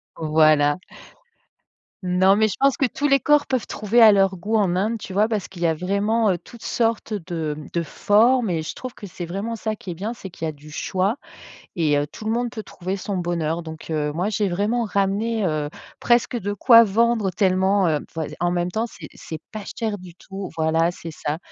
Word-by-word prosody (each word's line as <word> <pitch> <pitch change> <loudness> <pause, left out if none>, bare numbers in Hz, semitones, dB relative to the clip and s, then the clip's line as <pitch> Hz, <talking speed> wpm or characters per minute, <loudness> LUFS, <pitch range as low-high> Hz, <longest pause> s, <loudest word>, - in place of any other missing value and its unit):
Voilà. 155 -1 +3 1.3
Non 185 +2 +4
mais 215 +1 +3
je 190 - -4
pense 275 0 +4
que 275 - +1
tous 285 +3 -1
les 275 -2 +4
corps 295 -1 +4
peuvent 255 -3 -1
trouver 215 +3 +1
à 220 -1 +10
leur 195 -1 +3
goût 210 +5 -1
en 190 -4 +2
Inde, 215 +5 0
tu 195 - -8
vois? 210 +3 +2
Parce 215 -4 -2
qu'il 175 - -12
y 170 - +3
a 165 - +2
vraiment, 200 +6 +1
heu, 180 - 0
toutes 235 +6 -15
sortes 225 -1 -1
de 165 -6 -3 0.2
de 170 - 0
formes 225 +7 +3
et 165 -3 0
je 155 - -6
trouve 255 -1 -7
que 205 - -10
c'est 175 -1 -7
vraiment 200 +7 -4
ça 220 -1 -3
qui 185 - -7
est - - -3
bien, 200 +7 -4
c'est 200 -5 -9
qu'il 165 -2 -6
y - - 0
a - - -3
du 150 0 -15
choix 190 +7 -1 0.6
et 150 -3 +2
heu, 145 - +1
tout 215 - -11
le 220 - 0
monde 240 +1 0
peut 220 -1 -6
trouver 190 -1 -5
son 200 +1 -4
bonheur. 170 -2 -1
Donc 160 0 -9
heu, 150 -2 -1
moi 175 +6 -1
j'ai 210 -1 0
vraiment 210 +7 0
ramené, 205 +1 0
heu, 155 -3 -1 0.3
presque 240 +1 +2
de 205 -4 -2
quoi 230 +3 +7
vendre 225 -1 +2
tellement, 190 0 +2
heu, 155 -2 +1
vois 160 -1 -3 0.2
en 175 0 +2
même 175 0 0
temps 220 +5 -1
c'est 180 -9 -10
c'est 160 - -8
pas 215 -1 -5
cher 220 -3 -2
du 180 -2 -12
tout. 195 +1 -8
Voilà 160 +1 +2
c'est 165 -1 -8
ça. 150 0 -3
195 Hz, 225 wpm, -22 LUFS, 170-220 Hz, 1.3 s, à